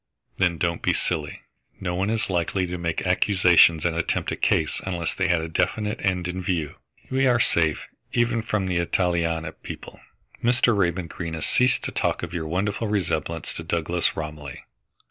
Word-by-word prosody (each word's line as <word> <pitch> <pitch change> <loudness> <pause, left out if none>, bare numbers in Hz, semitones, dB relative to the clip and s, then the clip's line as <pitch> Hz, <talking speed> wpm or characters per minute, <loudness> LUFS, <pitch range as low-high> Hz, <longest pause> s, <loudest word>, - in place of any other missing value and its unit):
"Then 90 -3 +2
don't 85 0 -1
be - - +2
silly. 75 -2 -2 0.4
No 90 -2 -2
one 95 +3 0
is 110 0 0
likely 90 +1 0
to 90 0 -5
make 85 +1 -2
accusations 90 -3 +5
and 85 -2 +1
attempt 85 - -1
a - - -1
case 75 - +1
unless 85 -3 -2
they 95 - 0
had 85 -3 +2
a 80 - -4
definite 105 +6 -1
end 90 -2 0
in 90 +1 -3
view. 85 -5 -2 0.3
We 135 0 +3
are 120 -2 +4
safe 80 -8 +1 0.2
even 120 -1 +1
from 105 -3 -1
the 90 -2 0
Elletania 85 -2 0
people. - - -9 0.4
Mr. 120 -1 +3
Raymond 90 -3 0
Greene 85 -2 -5
has 80 - -3
ceased 125 0 +2
to - - -3
talk - - -1
of 85 -1 -5
your 80 -3 -3
wonderful 100 +6 -1
resemblance 85 -5 -2
to 80 - -6
Douglas 85 +1 0
Romilly. 75 -3 -6
90 Hz, 180 wpm, -24 LUFS, 80-95 Hz, 0.4 s, accusations